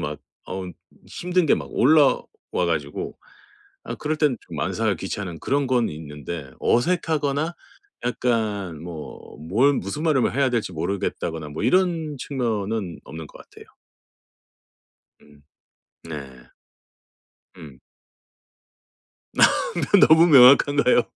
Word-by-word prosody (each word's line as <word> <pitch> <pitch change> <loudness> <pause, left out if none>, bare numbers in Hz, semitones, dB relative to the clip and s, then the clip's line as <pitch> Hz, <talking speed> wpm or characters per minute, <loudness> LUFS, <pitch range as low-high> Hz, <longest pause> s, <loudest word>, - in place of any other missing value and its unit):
막 75 +1 -4 0.3
어 95 0 -4 0.4
힘든 180 0 -1
게 - - +4
막 - - -6
올라와가지고 85 - +1 0.7
아 - - -5
그럴 155 +1 -2
땐 150 -6 +1
좀 - - -11
만사가 - - 0
귀찮은 90 -6 -6
그런 140 0 0
건 125 -3 +2
있는데 75 -1 -8
어색하거나 155 +1 0 0.5
약간 105 -9 -1
뭐 85 -3 -9
뭘 110 - +2
무슨 115 - -4
말을 150 -6 +3
뭐 - - +2
해야 135 +1 +1
될지 115 -6 -2
모르겠다거나 80 -2 -3
뭐 75 - -5
이런 170 -5 +1
측면은 110 - -3
없는 80 +1 -9
것 - - -16
같아요. - - -16 1.5
음. 75 -1 -21 0.6
네. 70 -6 -9 1.1
음. - - -12 1.5
너 335 - +3
너무 160 +2 +7
명확한가요? 140 -2 +6
115 Hz, 215 characters per minute, -23 LUFS, -, 1.5 s, 너무